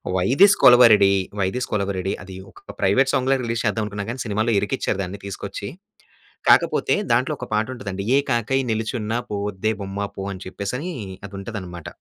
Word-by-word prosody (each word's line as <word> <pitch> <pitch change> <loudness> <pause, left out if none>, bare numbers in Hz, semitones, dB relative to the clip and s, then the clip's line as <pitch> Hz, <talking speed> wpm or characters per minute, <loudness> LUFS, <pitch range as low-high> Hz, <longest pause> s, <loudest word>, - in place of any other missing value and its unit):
'Why 90 0 +1
this 200 0 +8
Kolaveri 120 -3 +8
D, 100 - +5 0.3
vice 100 +7 -1
Kolaveri 100 -2 -1
D' - - 0
అది 95 0 -10 0.2
ఒక - - -13
private 130 +8 +3
Sangla 135 +1 +2
release 115 -1 -2
చేద్దాం 110 +1 0
అనుకున్నా 105 -1 -5
గాని 125 +1 -5
సినిమాలో 110 +2 0
ఇరికిచ్చారు 105 -2 -2
దాన్ని 95 +2 -7
తీసుకొచ్చి. 100 - -6 0.8
కాకపోతే, - - +4 0.2
దాంట్లో - - +2
ఒక - - -6
పాట 105 +1 +2
ఉంటదండి. 100 -5 -5
ఏ - - +5
కాకై 120 +3 +1
నిలిచున్న 110 0 -2 0.2
పోవద్దే 105 +1 -2
బొమ్మ 100 +1 -4
పో 95 - -5
అని 95 0 -9
చెప్పేసని 125 - -4 0.4
అది 100 - -18
ఉంటదనమాట. 95 -5 -7
105 Hz, 170 wpm, -22 LUFS, 100-120 Hz, 0.8 s, this